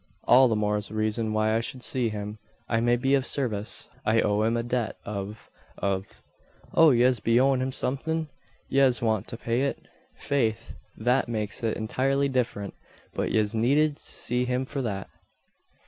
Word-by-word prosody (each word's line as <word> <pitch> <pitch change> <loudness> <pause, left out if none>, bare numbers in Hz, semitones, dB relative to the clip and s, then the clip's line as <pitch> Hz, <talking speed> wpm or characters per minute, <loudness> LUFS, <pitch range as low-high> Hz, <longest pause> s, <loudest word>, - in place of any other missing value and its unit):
"All 130 +2 +6
the 115 - +1
more 105 0 0
reason 110 +1 -1
why 110 0 +1
I 115 - +2
should 125 +2 -6
see 125 -3 +1
him. 105 0 -6 0.3
I 115 - +1
may 120 +1 +3
be 135 +3 +1
of 135 -1 +3
service. 115 -6 -2 0.2
I 110 +1 +3
owe 105 0 +2
him 115 +2 +1
a 115 - -1
debt 120 -2 -2
of 100 +1 -6 0.3
of 95 -1 -3 0.3
" - - -27
"Oh! 165 -1 +7
yez 125 -2 +4
be 115 +3 +3
owin' 135 0 +3
him 130 +1 -1
somethin? 155 +5 -2 0.4
Yez 135 -3 +3
want 110 -2 0
to 115 - -6
pay 120 +1 -1
it? 140 - 0 0.4
Faith, 115 -5 -1 0.2
that 125 +2 +1
makes 105 +1 -3
it 115 -2 -1
intirely 135 +5 0
different. 120 -6 -2 0.4
But - - -2
yez 105 -1 +1
needn't 145 +7 +2
see 125 +1 -1
him 125 +1 -1
for 140 +1 -4
that. 100 -6 -3
120 Hz, 175 wpm, -26 LUFS, 110-130 Hz, 0.4 s, Oh